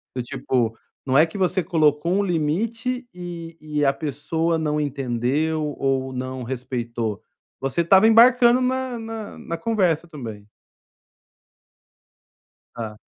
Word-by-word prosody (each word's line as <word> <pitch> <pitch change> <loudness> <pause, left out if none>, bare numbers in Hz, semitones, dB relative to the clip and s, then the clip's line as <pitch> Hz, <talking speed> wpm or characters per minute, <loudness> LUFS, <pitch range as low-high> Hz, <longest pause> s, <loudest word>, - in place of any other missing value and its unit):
Do 125 - -1
tipo, 120 -2 -1 0.3
não 135 0 +2
é 155 - +7
que 165 +5 -8
você 185 -1 +1
colocou 155 -1 +2
um 200 +1 +2
limite, 225 - -1
e 170 -2 -7
e 150 -1 -1
a 135 - +4
pessoa 160 +3 -1
não 150 -1 0
entendeu 145 +3 -1
ou 135 -1 0
não 130 0 -4
respeitou, 120 -3 -3 0.4
você 135 +5 0
estava 190 +5 +6
embarcando 240 +2 +6
na 255 -1 -1
na 225 -1 -7
na 170 - -5
conversa 175 -5 +1
também. 110 -9 -8 2.3
Tá. 110 -2 -6
155 Hz, 125 wpm, -23 LUFS, 130-190 Hz, 2.3 s, é